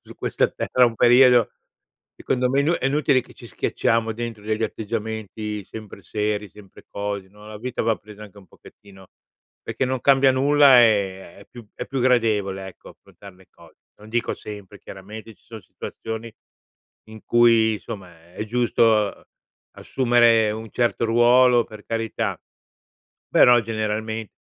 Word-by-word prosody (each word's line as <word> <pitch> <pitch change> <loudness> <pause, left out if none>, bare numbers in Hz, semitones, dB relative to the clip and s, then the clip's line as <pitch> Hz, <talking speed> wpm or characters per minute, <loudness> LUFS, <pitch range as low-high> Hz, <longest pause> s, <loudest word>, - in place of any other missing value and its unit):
su - - -14
questa - - -1
terra 125 -1 +1
un 115 - -3
periodo, 125 -1 +5 0.7
secondo 125 -1 -1
me, 140 +2 +2
inu 150 +4 +1
è 135 - -2
inutile 140 -1 +2
che - - -19
ci - - -13
schiacciamo 115 -1 -1
dentro 115 -2 -7
degli 110 +1 -2
atteggiamenti 110 -1 -5
sempre 105 -3 -11
seri, 105 +2 -3
sempre 100 -1 -17
cose, 100 -1 -5
no, 105 +2 -17
la 105 -1 -9
vita 125 +2 -4
va 115 -1 +1
presa 105 0 -14
anche 105 -1 -13
un 95 - -17
pochettino 95 -1 -18 0.6
perché 130 - -2
non 130 0 -2
cambia 135 -1 +4
nulla, 140 -1 +5
ehm, 95 -5 -1
è 100 - -16
più 120 -3 -13
è - - -7
più 135 - -4
gradevole, 105 -6 +1
ecco, 95 - -14
affrontar 100 -1 -16
le 95 0 -22
cose. - - -20 0.2
Non 105 +1 -15
dico 120 0 -1
sempre. 105 -1 -11
Chiaramente, 105 +5 -11
ci - - -35
son 110 -2 -11
situazioni 110 +5 -8 0.8
in 110 -1 -13
cui 115 -2 +4
insomma, 90 -6 -10
è 105 - -5
giusto, 120 +1 0
uhm, 105 -3 +1 0.5
assumere 120 -4 +2
un 110 0 -7
certo 120 -1 0
ruolo, 120 +1 +4
per 110 -1 -13
carità, 115 -1 -3 0.9
però 120 -1 +6
generalme 110 0 -4
110 Hz, 155 wpm, -22 LUFS, 105-120 Hz, 0.9 s, però